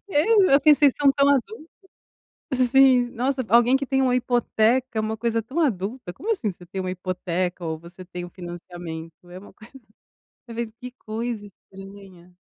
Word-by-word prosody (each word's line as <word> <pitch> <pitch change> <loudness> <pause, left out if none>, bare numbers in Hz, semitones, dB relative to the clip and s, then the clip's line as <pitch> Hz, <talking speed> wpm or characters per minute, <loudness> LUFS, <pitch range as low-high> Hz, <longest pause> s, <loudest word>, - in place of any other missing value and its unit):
É, 375 0 +4
eu 280 - +6
pensei, 295 -1 +6
são 280 +1 +3
tão 280 0 +2
adultos, 305 - 0 0.9
assim, 255 0 +4
nossa 260 +2 -1
alguém 240 +4 +5
que 275 - -4
tem 270 0 +1
uma 250 -1 +2
hipoteca 245 0 +1
é - - +1
uma 215 0 -2
coisa 230 0 -1
tão 265 +9 -5
adulta, 220 - -2
como 435 - -3
assim 240 - -1
você 175 0 -16
tem 190 +2 -5
uma 185 0 -3
hipoteca 180 -1 -3
ou 160 -1 -3
você 175 +3 -13
tem 180 0 -7
um 175 - -11
financiamento 175 -2 -8 0.2
é 180 - -10
uma 200 - -15
coisa, 215 +2 -17 0.8
eu 230 - -9
penso: 230 -2 -4
"Que 250 0 -8
coisa 220 -1 -5
estranha".. 195 -2 -15
225 Hz, 180 wpm, -23 LUFS, 185-265 Hz, 0.9 s, eu